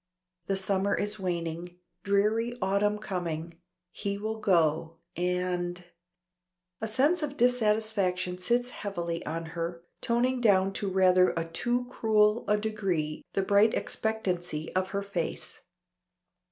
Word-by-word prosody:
The 195 - +1
summer 195 +1 +1
is 205 +1 -1
waning 175 -1 -3 0.2
dreary 215 +4 +1
autumn 205 +1 +1
coming. 170 -5 -4 0.3
He 200 0 -3
will 220 +2 -3
go 165 -4 +2 0.2
and 180 0 -1 1.0
A 220 - -1
sense 285 +11 +2
of 290 -2 -3
dissatisfaction 210 -6 +1
sits 245 +5 0
heavily 170 -6 -4
on 165 +2 -3
her, 170 0 -4 0.2
toning 245 +1 +1
down 195 -3 +4
to 200 0 -2
rather 185 -1 +4
a 165 - 0
too 240 +9 -1
cruel 220 -2 +2
a 210 - +3
degree 195 -8 -2
the 195 - +1
bright 205 +3 +4
expectancy 180 -8 -2
of 185 0 +1
her 200 0 -2
face. 185 -5 -4
195 Hz, 125 wpm, -29 LUFS, 175-220 Hz, 1.0 s, down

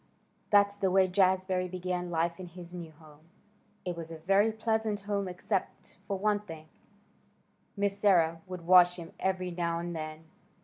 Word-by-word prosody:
That's 200 0 +4
the 195 -2 +1
way 190 0 +4
Jazbury 185 -1 +2
began 180 0 -3
life 170 +1 -1
in 185 - -7
his 175 0 -11
new 170 -2 -7
home. 155 0 -19 0.6
It 180 -1 -2
was 165 -1 -7
a 165 - -7
very 195 +7 +3
pleasant 220 -1 -1
home 200 -1 -2
except 185 +2 -4
for 200 - -1
one 210 +1 +1
thing; 165 -6 -10 1.1
Miss 200 0 0
Sarah 165 -5 +3
would 180 -2 -7
wash 180 0 +7
him 170 0 -9
every 185 -1 -1
now 170 -1 -1
and 170 0 -4
then. 155 0 -6
180 Hz, 165 wpm, -30 LUFS, 170-195 Hz, 1.1 s, wash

